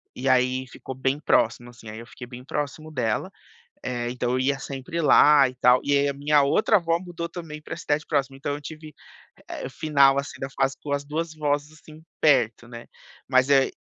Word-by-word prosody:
E 135 +2 -2
aí 130 0 +2
ficou 130 +1 -9
bem 135 +2 -1
próximo, 120 -3 +1
assim, 115 -2 -13
aí 110 - -8
eu 115 - -11
fiquei 125 - -10
bem 125 0 -10
próximo 150 +2 -4
dela, 115 -7 -1 0.5
eh, 120 -1 -3
então 125 -1 -2
eu 130 - 0
ia 135 +1 0
sempre 135 +5 -6
lá 150 -2 +6
e 130 - -9
tal, 125 0 +4
e 145 - 0
aí 140 0 +2
a - - -2
minha 145 +1 +2
outra 210 +9 +2
avó, 165 -2 0
mudou 170 -2 -6
também, 150 -3 -8
pra 165 - -7
cidade 150 -1 -1
próxima, 140 -3 -1
então, 140 +1 -3
eu 145 - -5
tive, 155 0 -10 0.6
eh, - - -6
final, 140 -3 +3
assim, 140 - -7
da 135 - -3
fase 135 0 -1
com 145 - -5
as 140 0 -2
2 155 +2 -4
avós, 145 -1 -1
assim, 155 0 -16 0.2
perto, 115 -6 +2
né, 120 -1 -10 0.4
mas 130 0 +3
aí 135 -1 +4
140 Hz, 210 wpm, -24 LUFS, 130-150 Hz, 0.6 s, lá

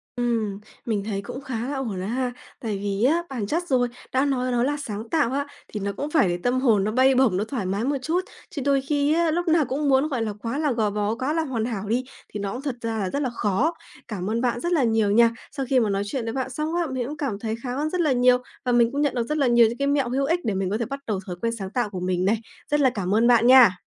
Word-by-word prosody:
Ừm, 230 -5 -1 0.3
mình 215 -4 -1
thấy 200 -2 -2
cũng 245 +6 -7
khá 245 -3 -4
là 285 - -3
ổn 225 -8 -3
đó - - -3
ha. 250 +2 -1 0.3
Tại 215 -4 -3
vì 200 +1 -2
á, 325 +7 +3
bản 240 -7 -3
chất 330 - 0
rồi, 250 -4 +2 0.2
đã 260 +2 +2
nói 255 -2 0
nó 240 -1 +2
là 290 +3 0
sáng 225 -5 -6
tạo 295 -7 +2
á, 280 +1 -1 0.2
thì 210 - -5
nó 200 0 -2
cũng 290 - -3
phải 310 - +4
để 175 - -1
tâm 250 +1 +2
hồn 225 -7 +3
nó 210 - 0
bay 260 +3 +4
bổng, 250 -8 +3
nó 205 - 0
thoải 225 -3 -4
mái 195 +4 -1
một 280 +3 0
chút. 330 +7 0 0.3
Chứ 290 - -5
đôi 275 -1 +3
khi 285 +2 +1
á, 335 0 +2
lúc 345 +2 -1
nào 320 -2 +4
cũng 280 +3 -1
muốn, 270 +2 +4
gọi 260 -5 -1
là, 215 -2 -2
quá 230 +6 -4
là 300 -2 +1
gò 225 -3 +1
bó, 210 +1 -1
quá 260 +5 -1
là 325 0 +1
hoàn 245 -7 -2
hảo 215 -4 -4
đi, 240 +4 +1 0.3
thì 210 - -4
nó 200 -1 -3
cũng 255 - -5
thật 275 -4 -3
ra 225 -1 -2
là 190 -2 -1
rất 280 - -2
là 265 - 0
khó. 235 - 0 0.3
Cảm 195 -3 -4
ơn 230 +2 0
bạn 240 -1 0
rất 345 +7 -2
là 310 -6 +3
nhiều 220 -3 +2
nha. 230 +2 +5 0.2
Sau 270 -1 -3
khi 265 - +4
mà 220 -3 +1
nói 200 0 0
chuyện 245 +4 -3
với 225 - -3
bạn 260 -1 -2
xong 305 +5 -3
á, 345 -1 +1
mình 255 -2 -2
cũng 300 +2 -6
cảm 250 -9 -3
thấy 220 0 -2
khá 250 -1 -3
hơn 300 +3 -1
rất 360 +2 0
là 305 -4 +2
nhiều 250 0 +5 0.3
và 250 - +1
mình 240 -1 +4
cũng 285 +1 -1
nhận 290 -3 +1
được 240 - +1
rất 300 - -1
là 275 - +3
nhiều 235 -1 +6
những 235 +2 -4
cái 280 0 0
mẹo 280 -3 +1
hữu 270 +3 0
ích 335 +5 +1
để 215 - 0
mình 190 -1 -1
có 210 - 0
thể 235 - -2
bắt 275 +4 -5
đầu 210 -4 -1
thói 180 - -5
quen 230 0 0
sáng 190 -1 -4
tạo 235 +1 -1
của 190 -3 -5
mình 180 0 0
này. 215 +3 +3 0.3
Rất 295 - +3
là 270 -2 +5
cảm 200 -5 -1
ơn 230 +2 +4
bạn 240 -1 +5
nha. 245 -8 +7
245 Hz, 305 wpm, -24 LUFS, 215-275 Hz, 0.3 s, nha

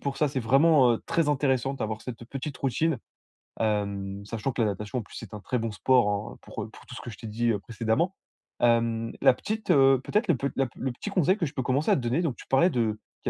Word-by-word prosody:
pour 140 -1 -3
ça. 150 - +2
C'est 135 -1 -2
vraiment, 135 +1 +5
heu, 115 - -3
très 165 -3 +1
intéressant 135 -2 +1
d'avoir 110 -4 -3
cette 120 -2 -7
petite 135 +3 -6
routine, 140 +1 0 0.6
hem, 100 -2 -1
sachant 115 +4 -3
que 120 - -1
la 110 - +3
natation 105 +5 -3
en - - -3
plus, 105 - -14
c'est 110 -3 -9
un 105 - -6
très 125 - -1
bon 115 0 -2
sport, 125 +2 +3
hein, 100 +1 -2
heu, - - -18
pour, - - -6
heu, - - -8
pour - - -16
tout - - -10
ce - - -7
que - - -7
je 110 - -9
t'ai 115 - -8
dit 115 +2 0
précédemment. 115 - 0 0.5
Hem, 115 -1 +2
la - - +7
petite, 215 - -3
heu 135 -4 +6
peut-être 210 - 0
le 170 - +5
pe 140 - -1
la 135 - +2
pe - - -19
le 130 - -1
petit 205 - -6
conseil 185 -2 +3
que 175 - 0
je 140 - -6
peux 130 - -2
commencer 130 +5 +1
à - - +6
te - - -2
donner: 120 +7 0
donc 155 -8 -1
tu - - -12
parlais 170 +7 +4
de 110 -7 0 0.2
qu'il - - -2
125 Hz, 265 wpm, -27 LUFS, 110-140 Hz, 0.6 s, la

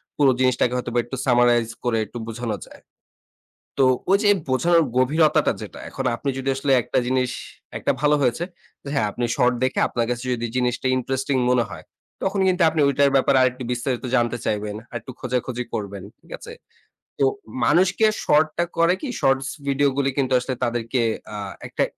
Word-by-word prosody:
পুরো 140 -3 +4
জিনিসটাকে 125 -1 +2
হয়তোবা 120 -1 -1
একটু 125 - -6
Summarize 120 -2 +3
করে 120 -2 +1
একটু 120 - -10
বোঝানো 115 -1 -3
যায়। - - -16 1.0
তো 135 - +4 0.3
ওই 200 - +6
যে 205 - +4 0.2
বোঝানোর 170 +6 +3
গভীরতাটা 150 +5 +3
যেটা - - -9
এখন 135 - -5
আপনি 140 +4 -3
যদি 135 +1 -2
আসলে 135 +1 -1
একটা - - -3
জিনিস 130 -1 +1 0.5
একটা - - 0
ভালো 150 0 +4
হয়েছে। 130 +6 +1 0.5
হ্যাঁ, 110 -6 +1
আপনি 120 - -2
শর্ট 125 0 +3
দেখে 130 - 0
আপনার 120 -1 -1
কাছে 120 +1 -3
যদি 120 -1 -3
জিনিসটা 125 +1 0
ইন্টারেস্টিং 135 +2 -1 0.2
মনে 125 -1 +3
হয় 85 -4 -9 0.4
তখন 195 +1 0
কিন্তু 185 -1 +2
আপনি 155 -1 0
ঐটার 140 0 +3
ব্যাপারে 135 0 +4
আরেকটু 130 0 +1
বিস্তারিত 125 0 -2
জানতে 120 0 +1
চাইবেন। 105 0 -2 0.2
আরেকটু 120 +2 -7
খোঁজাখুঁজি 125 -1 -2
করবেন, 100 -2 -4 0.2
ঠিক - - -21
আছে? - - -10 0.7
তো 140 - +4 0.4
মানুষকে 185 - +3 0.2
শর্ট 155 +1 +4
টা 175 - +2
করে 170 +2 +4
কি 290 - -4
শর্টস 135 0 +2 0.2
ভিডিও 140 +1 +2
গুলো 140 -1 +1
কিন্তু 130 -1 +1
আসলে 130 +1 -3
তাদেরকে 120 +1 -1 0.3
আ - - -4 0.3
একটা - - -1
130 Hz, 170 wpm, -23 LUFS, 120-140 Hz, 1.0 s, ওই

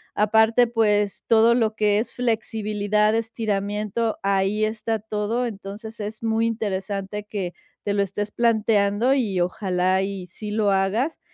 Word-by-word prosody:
Aparte, 220 +3 +4
pues, 210 -3 +1
todo 230 0 +5
lo 225 -3 +1
que 210 -1 +2
es 225 - -3
flexibilidad, 215 -3 0
estiramiento, 215 -1 -1
ahí 195 +2 +1
está 220 +1 -1
todo. 215 +3 -2
Entonces, 215 +1 -8
es 215 +1 -6
muy 225 0 +1
interesante 205 -2 -3
que 195 -4 -4 0.3
te 200 - -1
lo 200 -1 +2
estés 205 +2 -4
planteando 220 0 +2
y 210 -9 0
ojalá 185 0 +1
y 195 -2 -4
sí 210 +4 -7
lo 210 -1 +2
hagas. 200 +10 0
210 Hz, 140 wpm, -23 LUFS, 200-225 Hz, 0.3 s, todo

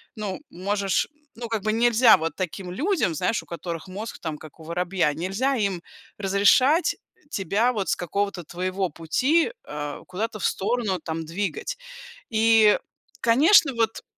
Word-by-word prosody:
ну, 205 -3 -4
можешь, 195 +1 0 0.3
ну, 235 0 -6
как 220 -3 -2
бы, 215 - +1
нельзя 235 0 +6
вот 160 -1 -3
таким 185 0 -4
людям, 270 - 0
знаешь, 200 +6 0
у - - -19
которых 170 0 -6
мозг 205 +5 -7
там 155 -3 -4
как 155 +2 -14
у - - -11
воробья, 175 -1 0
нельзя 195 - -1
им 200 -6 -1 0.4
разрешать 225 - +3 0.4
тебя 210 +6 +1
вот 200 -4 -2
с - - +2
какого-то 195 +1 -2
твоего 185 +2 -2
пути, 255 - +1
э, 150 -1 -6
куда-то 215 +4 -4
в - - -2
сторону 210 -3 0
там 160 0 -4
двигать". 205 - -3 0.5
И 220 -1 +5 0.4
конечно, 275 - +5
вот 225 -1 0
200 Hz, 150 wpm, -24 LUFS, 180-230 Hz, 0.5 s, нельзя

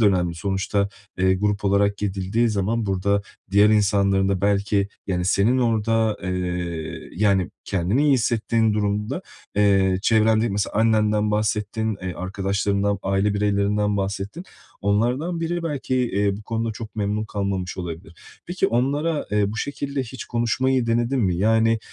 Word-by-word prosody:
de 110 - +4
önemli. 90 -4 +2
Sonuçta, 100 +3 -1 0.3
eee, 95 0 +3
grup 105 +1 -1
olarak 100 +1 +2
gidildiği 100 +3 0
zaman 105 +2 -1
burada 100 +1 +1 0.3
diğer 100 +2 +5
insanların 100 -2 +3
da 95 -2 0
belki, 100 0 +1 0.2
yani, 90 -2 -1
senin 105 +7 +3
orada, 115 -2 +1
eee, 90 -3 -4
yani, 95 -3 +2
kendini 100 - 0
iyi 145 - +4
hissettiğin 115 -2 +1
durumda, 105 - -1 0.3
eee, 95 -2 +3
çevrende 110 +1 +3
mesela 100 0 -2
annenden 105 -1 +2
bahsettin, 105 +1 -1
eee, 90 -1 -4
arkadaşlarından, 100 +2 -1
aile 95 +2 +1
bireylerinden 105 0 +1
bahsettin. 100 - -3 0.4
Onlardan 125 - 0
biri 170 +1 -2
belki, 145 -5 -2
eee, 100 -5 +1
bu 105 - -10
konuda 115 +1 -2
çok 110 0 -9
memnun 105 +1 -1
kalmamış 100 -3 -3
olabilir. 85 -1 -7 0.3
Peki 175 +1 0
onlara, 145 +6 0
eee, 105 -1 +1
bu 110 - -6
şekilde 140 +2 -3
hiç 130 +1 -8
konuşmayı 120 +1 0
denedin 120 +3 +1
mi? 95 -5 +1
Yani, 110 +3 +3
105 Hz, 140 wpm, -23 LUFS, 100-115 Hz, 0.4 s, diğer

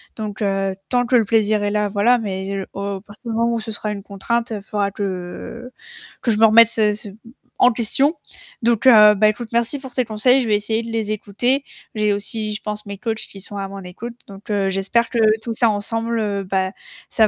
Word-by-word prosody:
Donc 215 -2 -5 0.5
tant 245 -1 +2
que 250 - +1
le 230 - +4
plaisir 215 -1 +2
est 205 - 0
là 210 -1 0
voilà, 220 +5 +3
mais 195 -2 -4
au - - -7 0.2
à - - -12
partir 210 +4 -12
du 225 - -2
moment 235 0 +1
où 230 - -1
ce 220 0 -6
sera 210 0 -2
une 205 -1 -5
contrainte, 230 +4 -2
il 205 -2 -5
faudra 205 -1 -1
que 200 +5 -6 0.5
que 235 - +2
je 210 - +1
me 225 - +7
remette 230 +1 +7
ce 215 -2 +2
ce 210 0 -5 0.5
en 250 - +5
question. 270 +7 +1 0.5
Donc 235 0 +2
ben, 210 -4 +7
écoute, 215 +2 +2
merci 235 +4 +1
pour 265 -2 -11
tes 255 - +1
conseils, 240 +4 +3
je 240 - -2
vais 210 - +4
essayer 220 +2 -1
de 230 - -7
les 220 -2 -2
écouter. 240 +7 -1 0.3
J'ai 210 -1 +1
aussi, 210 +1 0
je 210 - -4
pense, 210 0 -5
mes 200 0 -7
coachs 225 +2 -2
qui 195 - -7
sont 200 +2 0
à 195 -1 -3
mon 195 - -8
écoute. 200 +7 -8
Donc 195 0 -13 0.2
j'espère 195 +5 +1
que 235 - -2 0.2
tout 230 0 -4
ça 230 0 +3
ensemble, 215 -1 -1
ben 190 0 -1 0.4
ça 220 - +4
215 Hz, 215 wpm, -20 LUFS, 205-235 Hz, 0.5 s, me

